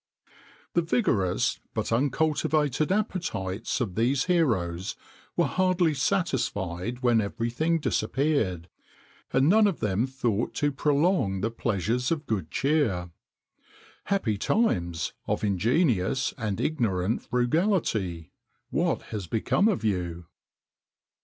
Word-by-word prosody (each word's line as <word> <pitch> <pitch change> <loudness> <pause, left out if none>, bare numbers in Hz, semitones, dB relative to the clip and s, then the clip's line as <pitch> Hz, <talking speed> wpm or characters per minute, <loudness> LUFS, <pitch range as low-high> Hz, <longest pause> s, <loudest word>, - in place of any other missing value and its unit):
[XXIX - - -36
2] - - -26 0.4
The 170 - +3
vigorous 120 - +1 0.2
but - - -2
uncultivated 150 +3 +1
appetites 165 - -2
of 110 -7 -2
these 125 +6 +1
heroes 110 - 0 0.4
were - - +4
hardly 185 -3 +2
satisfied 120 - -1
when 120 -2 +4
everything 120 +10 -1
disappeared, 125 - 0 0.6
and 135 +2 +3
none 210 +4 +6
of 195 - -2
them 105 +4 0
thought 120 -4 -1
to 145 0 +1
prolong 140 - +1
the 110 +3 -1
pleasures 115 +2 -1
of 160 -2 -1
good 100 - -2
cheer.[XXIX 135 - 0
3] - - -26 0.9
Happy 130 - 0
times 85 - 0
of - - -1
ingenuous 115 - +1
and 105 -4 -3
ignorant 110 - 0
frugality! 120 - 0 0.4
what - - 0
has 100 -5 -4
become 115 - +2
of 200 - 0
you? 90 -5 -2
120 Hz, 115 wpm, -27 LUFS, 95-155 Hz, 0.9 s, none